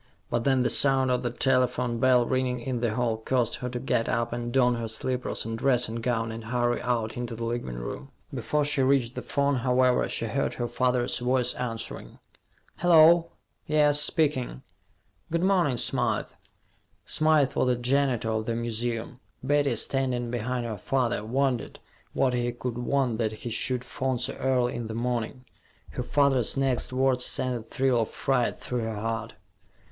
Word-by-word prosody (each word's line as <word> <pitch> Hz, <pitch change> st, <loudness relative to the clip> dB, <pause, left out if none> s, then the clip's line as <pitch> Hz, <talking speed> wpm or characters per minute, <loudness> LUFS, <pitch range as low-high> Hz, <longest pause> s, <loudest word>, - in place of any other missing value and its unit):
But 120 Hz, -1 st, 0 dB
then 130 Hz, -2 st, +3 dB
the -, -, +2 dB
sound 135 Hz, -2 st, +4 dB
of 125 Hz, 0 st, +1 dB
the 125 Hz, -, -1 dB
telephone 125 Hz, -1 st, +1 dB
bell 125 Hz, -1 st, +4 dB
ringing 130 Hz, 0 st, 0 dB
in 125 Hz, 0 st, -3 dB
the 115 Hz, -2 st, -1 dB
hall 120 Hz, -2 st, 0 dB
caused 120 Hz, +1 st, 0 dB
her 125 Hz, -, -4 dB
to 125 Hz, -, -4 dB
get 120 Hz, -2 st, 0 dB
up 115 Hz, 0 st, -1 dB
and 120 Hz, 0 st, -4 dB
don 125 Hz, -1 st, +3 dB
her 115 Hz, -1 st, -3 dB
slippers 125 Hz, +2 st, -3 dB
and 115 Hz, 0 st, -3 dB
dressing 120 Hz, -2 st, +1 dB
gown 115 Hz, -1 st, -1 dB
and 110 Hz, 0 st, -7 dB
hurry 120 Hz, +1 st, 0 dB
out 115 Hz, -2 st, -1 dB
into 120 Hz, -1 st, -4 dB
the 115 Hz, -, -6 dB
living 115 Hz, -, -3 dB
room. -, -, -6 dB, 0.2 s
Before 150 Hz, -1 st, 0 dB
she 145 Hz, -1 st, 0 dB
reached 130 Hz, -3 st, +2 dB
the -, -, -5 dB
phone, 140 Hz, -1 st, 0 dB
however, 125 Hz, 0 st, +2 dB
she -, -, -2 dB
heard -, -, -1 dB
her 120 Hz, -, -2 dB
father's 125 Hz, +1 st, 0 dB
voice 125 Hz, 0 st, +1 dB
answering. 115 Hz, -2 st, -6 dB, 0.6 s
"Hello.... 170 Hz, 0 st, +5 dB, 0.3 s
Yes, 150 Hz, -1 st, +4 dB
speaking. 145 Hz, -4 st, 0 dB, 0.7 s
Good 170 Hz, +1 st, 0 dB
morning, 180 Hz, -9 st, +2 dB
Smythe." -, -, +1 dB, 0.8 s
Smythe 155 Hz, -3 st, +3 dB
was -, -, +1 dB
the 125 Hz, -, +3 dB
janitor 125 Hz, -2 st, 0 dB
of 110 Hz, 0 st, -2 dB
the 115 Hz, -, -1 dB
museum. 120 Hz, +1 st, -3 dB, 0.2 s
Betty, 140 Hz, -1 st, +2 dB
standing 125 Hz, -3 st, -1 dB
behind 120 Hz, +1 st, -2 dB
her 110 Hz, -4 st, -5 dB
father, 125 Hz, -1 st, 0 dB
wondered 130 Hz, +1 st, -1 dB, 0.4 s
what 130 Hz, -2 st, +1 dB
he 120 Hz, 0 st, 0 dB
could 120 Hz, 0 st, -5 dB
want 125 Hz, -2 st, 0 dB
that 110 Hz, -2 st, 0 dB
he 115 Hz, +2 st, -6 dB
should 125 Hz, +2 st, -1 dB
phone 130 Hz, 0 st, -2 dB
so 125 Hz, -, -2 dB
early 125 Hz, -2 st, +1 dB
in 120 Hz, -2 st, -4 dB
the 110 Hz, -, -6 dB
morning. 120 Hz, +1 st, -3 dB, 0.5 s
Her -, -, -4 dB
father's 135 Hz, -2 st, +2 dB
next 135 Hz, -3 st, 0 dB
words 130 Hz, -1 st, +1 dB
sent 130 Hz, 0 st, 0 dB
a 120 Hz, -, -4 dB
thrill 125 Hz, +1 st, 0 dB
of 110 Hz, -, -2 dB
fright 125 Hz, -3 st, 0 dB
through 125 Hz, -, -3 dB
her 110 Hz, -1 st, -3 dB
heart. 115 Hz, +1 st, -4 dB
125 Hz, 175 wpm, -27 LUFS, 115-130 Hz, 0.8 s, Hello